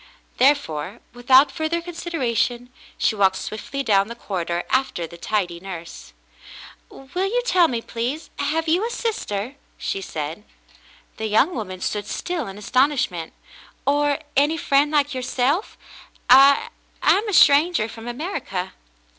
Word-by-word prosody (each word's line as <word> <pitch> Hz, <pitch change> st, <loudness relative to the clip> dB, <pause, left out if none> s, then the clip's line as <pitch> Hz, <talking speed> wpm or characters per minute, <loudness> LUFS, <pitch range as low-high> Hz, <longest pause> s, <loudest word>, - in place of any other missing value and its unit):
There 275 Hz, +3 st, +6 dB
fore, 180 Hz, -, -6 dB
without 260 Hz, +3 st, +5 dB
further 315 Hz, +4 st, -1 dB
consideration, 255 Hz, -8 st, -2 dB, 0.3 s
she -, -, +2 dB
walked 195 Hz, -2 st, +3 dB
swiftly 245 Hz, +8 st, -5 dB
down 200 Hz, -4 st, +3 dB
the 235 Hz, -, -7 dB
corridor 175 Hz, -6 st, -3 dB
after 260 Hz, -10 st, 0 dB
the 170 Hz, -, -11 dB
tidy 175 Hz, -1 st, -2 dB
nurse. 175 Hz, -3 st, -9 dB, 0.8 s
"Will 355 Hz, +9 st, -4 dB
you -, -, 0 dB
tell 360 Hz, -7 st, +4 dB
me, 235 Hz, -5 st, -3 dB
please, 250 Hz, +7 st, -4 dB
have 320 Hz, +3 st, -1 dB
you 345 Hz, +6 st, +2 dB
a 460 Hz, -, -1 dB
sister 455 Hz, -, -3 dB
.f^" 280 Hz, -, -21 dB, 0.2 s
she 195 Hz, -, -3 dB
said. 160 Hz, +2 st, -5 dB, 0.7 s
The 220 Hz, -, -3 dB
young 225 Hz, -, +3 dB
woman 185 Hz, -, -5 dB
stood 210 Hz, -1 st, -3 dB
still 345 Hz, -7 st, -3 dB
in 195 Hz, +1 st, -8 dB
astonishment. 245 Hz, -, 0 dB, 0.5 s
"Or 290 Hz, 0 st, +2 dB
— 295 Hz, -, -37 dB
any 295 Hz, +4 st, +3 dB
friend 285 Hz, -1 st, +2 dB
like 290 Hz, -1 st, +1 dB
yourself? 260 Hz, -, -1 dB, 0.5 s
I 275 Hz, +2 st, +7 dB, 0.2 s
— -, -, -24 dB
I -, -, +5 dB
am 430 Hz, +1 st, -4 dB
a -, -, -3 dB
stranger 300 Hz, -5 st, +5 dB
from 225 Hz, +1 st, -10 dB
America." 240 Hz, -, -4 dB
260 Hz, 150 wpm, -22 LUFS, 205-300 Hz, 0.8 s, I